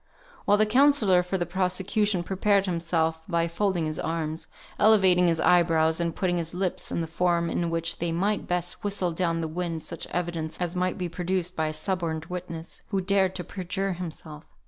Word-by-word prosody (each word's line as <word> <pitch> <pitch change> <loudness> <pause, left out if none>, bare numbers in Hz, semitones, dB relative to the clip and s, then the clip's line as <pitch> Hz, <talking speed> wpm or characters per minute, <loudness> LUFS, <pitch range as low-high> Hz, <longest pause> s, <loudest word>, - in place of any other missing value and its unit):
while 205 - +4
the 215 - +4
counsellor 225 -6 +4
for 180 +2 -2
the 175 - -1
prosecution 190 +2 0
prepared 195 +2 +2
himself 165 -2 0
by 170 -2 +1
folding 175 -1 0
his 155 0 -3
arms, 160 -1 -3 0.3
elevating 190 -4 +5
his 165 -1 +2
eyebrows, 160 -2 +3
and 170 -1 -1
putting 180 -2 0
his 165 0 -3
lips 185 -1 -2
in - - -1
the - - -1
form 170 +1 0
in 170 -1 -1
which 165 0 -2
they 170 0 -1
might 200 +5 0
best 175 0 -2
whistle 200 -3 0
down 165 -1 0
the 160 - -2
wind 165 0 -3
such 170 - -6
evidence 170 -3 -3
as 175 0 -2
might 180 0 0
be 180 - -2
produced 180 +1 -2
by 160 -1 0
a - - -2
suborned 160 -1 -2
witness, 170 -2 -7
who 195 - -1
dared 190 0 +1
to 180 - -3
perjure 195 +1 -3
himself. 160 -3 -8
175 Hz, 190 wpm, -26 LUFS, 165-190 Hz, 0.3 s, elevating